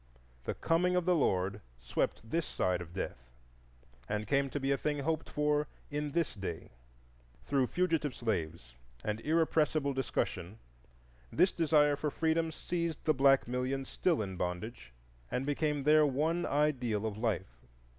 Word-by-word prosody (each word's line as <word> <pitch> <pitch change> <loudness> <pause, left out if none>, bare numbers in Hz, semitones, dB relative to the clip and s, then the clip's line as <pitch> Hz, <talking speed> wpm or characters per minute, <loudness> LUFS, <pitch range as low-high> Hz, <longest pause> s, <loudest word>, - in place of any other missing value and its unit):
The - - -2
"Coming 180 +2 +2
of 180 -2 +1
the 180 - +4
Lord" 100 - +1 0.2
swept 110 - -2
this 165 +7 -1
side 90 -1 0
of 85 -1 -9
Death, 65 -9 -5 0.8
and 105 0 -1
came 140 +1 +1
to 145 - -3
be 135 0 0
a - - +4
thing 150 +1 -1
to 140 - -3
be - - -7
hoped 160 0 -1
for 150 0 +1 0.2
in 145 0 -2
this 170 -2 +1
day. 95 -6 -6 0.7
Through 135 -2 +2
fugitive 165 -5 0
slaves 85 - -3 0.3
and 105 +1 -1
irrepressible 155 -1 +2
discussion 105 -7 -2 0.7
this 185 - +4
desire 150 -3 +4
for 150 +1 -1
freedom 160 +2 +1
seized 170 0 -3
the 155 - +4
black 135 -1 +4
millions 130 +2 -2
still 165 -11 +1
in 95 -2 -6
bondage, 90 - -4 0.4
and 125 - -1
became 145 0 0
their 155 +2 +6
one 155 +5 +1
ideal 125 -7 +1
of 105 -1 -3
life. 95 - -2
140 Hz, 155 wpm, -32 LUFS, 105-155 Hz, 0.8 s, their